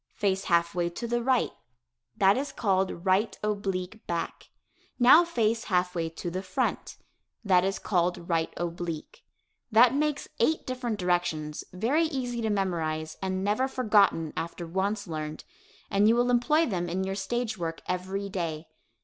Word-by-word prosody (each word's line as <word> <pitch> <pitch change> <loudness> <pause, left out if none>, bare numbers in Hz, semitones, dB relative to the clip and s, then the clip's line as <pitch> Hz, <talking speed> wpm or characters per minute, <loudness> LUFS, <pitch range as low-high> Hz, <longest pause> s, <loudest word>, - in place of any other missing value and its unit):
Face 195 -1 0
half 170 -1 +2
way 175 -1 0
to 175 +7 -6
the 240 +1 0
right 255 +1 +2 0.7
that 195 0 +5
is 275 +2 -2
called 190 -4 0
"right 195 +4 +2
oblique 200 -1 -2
back." 170 -1 -4 0.5
Now 260 +7 +8
face 230 -8 0
half 180 -2 +1
way 165 -2 -2
to 170 +1 -6
the 185 +2 -3
front. 185 -1 -2 0.5
That 180 -3 +4
is 195 +1 0
called 175 -2 0
"right 165 -2 0
oblique." 175 - -5 0.5
That 235 +3 +6
makes 295 0 0
eight 315 - +2
different 250 -4 -3
directions, 175 -5 -1
very 250 - +1
easy 250 -6 -3
to 220 - 0
memorize 160 -6 -1
and 190 0 -2
never 210 +6 +1
forgotten 210 - +2
after 170 +1 -4
once 195 +5 -1
learned, 155 -3 -5 0.5
and 200 +1 +4
you 225 - +5
will 245 +1 +2
employ 275 +7 +3
them 175 - -2
in 185 +2 -1
your 190 0 -2
stage 220 +2 -2
work 165 -1 -3
every 190 +2 -2
day. 165 -5 -4
195 Hz, 160 wpm, -28 LUFS, 175-235 Hz, 0.7 s, Now